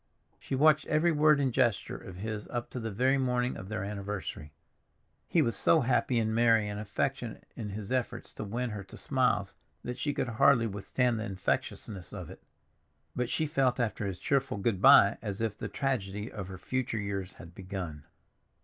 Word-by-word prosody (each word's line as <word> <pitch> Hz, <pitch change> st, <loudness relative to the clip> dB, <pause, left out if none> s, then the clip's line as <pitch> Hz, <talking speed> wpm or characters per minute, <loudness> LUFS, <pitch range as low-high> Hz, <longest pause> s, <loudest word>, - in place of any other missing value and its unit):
She -, -, -3 dB
watched 155 Hz, +2 st, +4 dB
every 155 Hz, +3 st, +3 dB
word 150 Hz, -1 st, +5 dB
and 135 Hz, -3 st, +1 dB
gesture 120 Hz, -5 st, +1 dB
of 90 Hz, -, -9 dB
his 105 Hz, +2 st, -5 dB
up 120 Hz, -1 st, -4 dB
to 125 Hz, -, -4 dB
the 115 Hz, -1 st, -3 dB
very 130 Hz, +6 st, +2 dB
morning 125 Hz, -1 st, 0 dB
of 95 Hz, -, -8 dB
their 105 Hz, -3 st, -3 dB
anniversary. 100 Hz, -6 st, -5 dB, 0.8 s
He 165 Hz, -, +3 dB
was 115 Hz, -5 st, -1 dB
so 160 Hz, +10 st, +4 dB
happy 125 Hz, 0 st, +2 dB
and 110 Hz, -1 st, +1 dB
merry 115 Hz, -2 st, +4 dB
and 105 Hz, 0 st, -4 dB
affectionate 105 Hz, -2 st, -3 dB
in 105 Hz, -, -5 dB
his 100 Hz, +1 st, -6 dB
efforts 120 Hz, -2 st, -2 dB
to -, -, -6 dB
win 120 Hz, +4 st, -3 dB
her 105 Hz, -2 st, -5 dB
to 95 Hz, -, -12 dB
smiles 125 Hz, -7 st, +1 dB, 0.3 s
that 125 Hz, +1 st, -5 dB
she 145 Hz, -, 0 dB
could 140 Hz, -, -2 dB
hardly 125 Hz, +1 st, +4 dB
withstand 115 Hz, +3 st, 0 dB
the 110 Hz, -, -3 dB
infectiousness 95 Hz, -1 st, -3 dB
of -, -, -7 dB
it. -, -, -12 dB, 0.7 s
But 125 Hz, -1 st, -1 dB
she 160 Hz, -, 0 dB
felt 135 Hz, -5 st, +1 dB
after 110 Hz, -3 st, -1 dB
his 95 Hz, -2 st, -4 dB
cheerful 135 Hz, -1 st, 0 dB
good 100 Hz, -1 st, 0 dB
by 100 Hz, +1 st, +7 dB
as 100 Hz, -3 st, -4 dB
if 110 Hz, -2 st, -1 dB
the -, -, -5 dB
tragedy 105 Hz, -5 st, -2 dB
of 95 Hz, -4 st, -6 dB
her 95 Hz, 0 st, -7 dB
future 130 Hz, +3 st, -2 dB
years 100 Hz, -2 st, -3 dB
had 85 Hz, 0 st, -12 dB
begun. 90 Hz, -6 st, -6 dB
115 Hz, 190 wpm, -30 LUFS, 100-130 Hz, 0.8 s, by